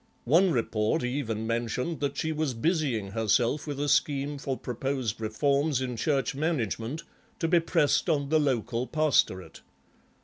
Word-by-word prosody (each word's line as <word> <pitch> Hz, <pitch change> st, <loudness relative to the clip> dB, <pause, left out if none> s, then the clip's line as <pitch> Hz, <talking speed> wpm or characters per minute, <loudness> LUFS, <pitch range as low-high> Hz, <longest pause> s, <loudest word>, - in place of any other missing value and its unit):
One 170 Hz, +9 st, +5 dB
report 115 Hz, 0 st, 0 dB
even 125 Hz, -4 st, -2 dB
mentioned 120 Hz, +7 st, -2 dB
that 140 Hz, -1 st, -2 dB
she 160 Hz, -, -1 dB
was 155 Hz, -4 st, -1 dB
busying 130 Hz, -, 0 dB
herself 115 Hz, +6 st, +1 dB
with 145 Hz, -2 st, -4 dB
a 145 Hz, -, 0 dB
scheme 145 Hz, 0 st, +1 dB
for 135 Hz, -2 st, -3 dB
proposed 125 Hz, -2 st, -3 dB
reforms 140 Hz, +6 st, +1 dB
in 125 Hz, -2 st, -3 dB
Church 135 Hz, +3 st, 0 dB
management 135 Hz, -, -2 dB, 0.3 s
to 165 Hz, -, -1 dB
be 170 Hz, +1 st, +4 dB
pressed 165 Hz, 0 st, +1 dB
on 140 Hz, -3 st, +1 dB
the 155 Hz, +1 st, +4 dB
local 125 Hz, -3 st, 0 dB
pastorate. 150 Hz, -, +1 dB
135 Hz, 145 wpm, -28 LUFS, 115-155 Hz, 0.3 s, One